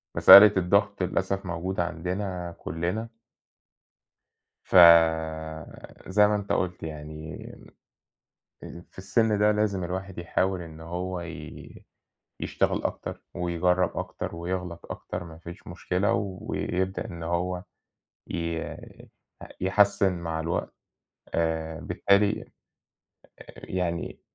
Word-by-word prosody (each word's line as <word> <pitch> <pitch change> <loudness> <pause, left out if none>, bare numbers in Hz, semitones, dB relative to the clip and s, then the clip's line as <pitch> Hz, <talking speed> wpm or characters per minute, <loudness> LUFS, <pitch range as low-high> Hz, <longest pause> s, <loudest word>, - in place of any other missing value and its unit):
مسألة 105 +1 +10
الضغط 100 +2 +2
للأسف 95 +2 -1
موجودة 90 +1 -2
عندنا 90 0 -4
كُلّنا. 90 +8 -3 1.6
ف - - -5 1.3
زي 105 +2 +4
ما 105 - +1
أنت 100 -1 -4
قُلت 90 0 -1
يعني 75 0 -7 1.2
آآ 85 - -9
في - - -26
السِن 105 +3 +1
ده 105 0 +4
لازم 105 -3 0
الواحد 95 +2 -5
يحاول 90 +2 -1
إنه 80 -1 -10
هو 90 +2 -4
ي 80 -2 -10 0.5
يشتغل - - -1
أكتر - - -4
ويجرّب 90 +1 0
أكتر - - -5
ويغلط 90 0 -5
أكتر - - -6
ما 80 -2 -11
فيش 85 +2 -11
مشكلة 90 +3 -1 0.3
ويبدأ 95 +3 -2
إن 85 -6 -7
هو 90 +2 -2 0.7
ي 85 -1 -2 1.0
يحسِّن 95 0 +3
مع 80 -1 -3
الوقت، 85 +2 -3 0.6
آآ 80 -1 -1
بالتالي 100 +4 +2 1.0
آآ - - -15
يعني 85 -2 -3
90 Hz, 105 wpm, -26 LUFS, 85-95 Hz, 1.6 s, مسألة